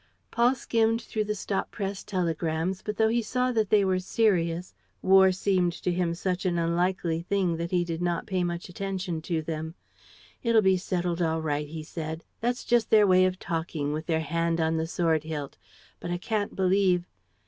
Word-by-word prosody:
Paul 240 +2 +3
skimmed 225 -2 +1
through 215 -2 -2
the 210 0 -2
stop 195 -1 -2
press 195 -2 -4
telegrams, 170 -1 -1
but, 210 -1 -4
though 220 - +4
he 235 +1 +2
saw 250 +3 0
that 220 -4 +1
they 210 -2 +4
were 185 -1 +1
serious, 180 -4 0 0.3
war 190 0 +6
seemed 185 -2 +1
to 180 - -2
him 175 -1 0
such 180 0 -2
an 180 -2 0
unlikely 170 0 0
thing 180 -2 0
that 170 +1 -3
he 175 -1 +1
did 165 0 -4
not 175 -1 -1
pay 185 -2 -1
much 175 0 -3
attention 185 -2 -4
to 160 -1 -2
them. 160 +1 -5 0.7
"It'll 230 -3 +3
be 190 0 +5
settled 175 -1 -2
all 160 -1 0
right," 150 -1 -1
he 155 +1 -7
said. 160 0 -6 0.2
"That's 245 +1 -1
just 240 -2 +2
their 215 -1 +6
way 185 -1 +5
of 185 0 0
talking, 160 -4 -3
with 155 +1 -4
their 160 -1 +1
hand 165 +2 0
on 160 0 +1
the 160 0 -1
sword 165 -2 +1
hilt; 150 -3 -5 0.4
but 175 - -6
I 175 - -1
can't 205 +2 -2
believe 185 -2 +2
180 Hz, 190 wpm, -27 LUFS, 165-195 Hz, 0.7 s, war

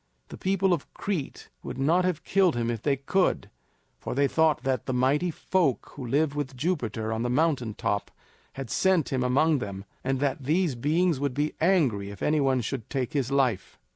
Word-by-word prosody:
The - - -9
people 190 -1 +2
of 165 - -4
Crete 180 -9 -4
would - - -6
not 165 +7 +2
have 180 -4 -1
killed 190 -5 +3
him 120 0 0
if 115 -3 -4
they 140 +1 +2
could; 180 +8 0 0.5
for - - -5
they 140 +1 +3
thought 160 0 +2
that 130 -3 -1
the 130 - -1
Mighty 140 +7 +2
Folk 170 -3 0
who 140 - -8
lived 140 +4 +1
with 140 -3 -4
Jupiter 120 - -1
on 110 - -2
the 120 - -1
mountain 125 -5 +1
top 100 0 -1 0.4
had 135 -4 -7
sent 185 -9 +2
him 130 - +1
among 145 +4 +3
them, 100 -3 -6 0.2
and 135 0 0
that 140 0 -1
these 165 +1 +2
beings 155 +5 +1
would 140 -3 -1
be 150 +2 0
angry 140 - +2
if 100 -2 -8
any 155 0 +2
one 135 -2 +2
should 115 0 -5
take 135 +1 -2
his 135 -4 0
life. 130 -9 0
140 Hz, 200 wpm, -27 LUFS, 125-160 Hz, 0.5 s, killed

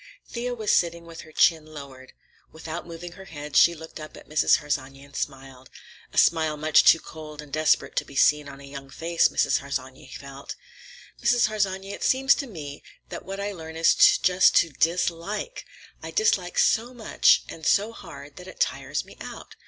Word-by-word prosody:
Thea 245 +1 -4
was 215 -3 -1
sitting 170 -1 +1
with 165 -1 -10
her 155 - -15
chin 160 0 +3
lowered. 140 -4 -12 0.4
Without 160 +2 -7
moving 170 +1 -8
her 190 +2 -12
head 150 -3 -9
she 170 - +6
looked 160 0 -10
up 155 0 -10
at - - -15
Mrs. 155 0 +3
Harsanyi 135 -2 -4
and 140 0 -17
smiled; 135 -2 -6 0.4
a - - -11
smile 160 -2 +3
much 155 +1 +4
too 165 - +6
cold 155 -2 -11
and 150 -2 -10
desperate 155 0 +1
to - - +2
be 140 - -14
seen 150 +1 +3
on 140 - -11
a - - -13
young 140 0 -10
face, 165 +4 +1
Mrs. - - +1
Harsanyi 135 -2 -6
felt. 140 - -9 0.7
"Mrs. 240 -3 +3
Harsanyi, 195 -2 -2
it - - -7
seems 270 +1 +4
to 280 - -4
me 150 - -8 0.3
that - - -8
what 195 +2 -6
I 200 +1 -3
learn 160 -4 -9
is 165 - +4
just 185 +1 +5
to 165 - +4
dislike. 175 - -2 0.4
I - - -7
dislike 445 +2 +1
so 250 - +2
much 225 -3 +3
and 160 - -10
so 205 +7 +2
hard - - -12
that - - -11
it - - -12
tires - - -1
me - - -16
out. - - -9
160 Hz, 190 wpm, -25 LUFS, 145-195 Hz, 0.7 s, she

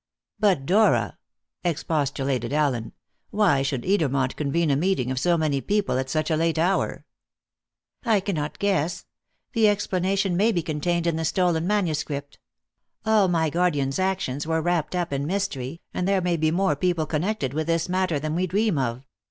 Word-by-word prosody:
"But, 190 -10 +2
Dora," 210 +7 +2 0.4
expostulated 140 -7 -1
Allen, 140 -6 0 0.4
"why 190 -10 +3
should 135 -2 -2
Edermont 140 -9 +1
convene 150 +2 0
a - - +3
meeting 145 -5 0
of 130 - -1
so 175 +4 +2
many 150 -4 0
people 200 -8 0
at 130 0 -3
such 155 +3 -1
a - - +3
late 165 +1 +1
hour?" 180 +4 0 1.0
"I 225 -5 +3
cannot 160 -6 -3
guess. 180 -4 0 0.5
The 225 -3 +4
explanation 195 -1 0
may 210 +6 +3
be 175 -6 -1
contained 165 +3 -1
in 170 -2 +1
the 160 - -2
stolen 170 0 +1
manuscript. 150 -8 -2 0.7
All 215 -3 +4
my 165 -3 +1
guardian's 145 -5 0
actions 185 -7 -1
were 160 0 +1
wrapped 175 0 -1
up 175 -4 -1
in 140 +1 -2
mystery, 165 -6 -3
and 180 - -1
there 195 -1 +3
may 175 -1 0
be 155 -1 +1
more 175 -1 +1
people 170 +1 0
connected 155 -2 -2
with 155 +1 -2
this 165 0 +1
matter 185 -3 0
than 155 +1 -3
we 180 +3 0
dream 200 -2 +1
of. 125 +1 -2
165 Hz, 170 wpm, -24 LUFS, 145-185 Hz, 1.0 s, The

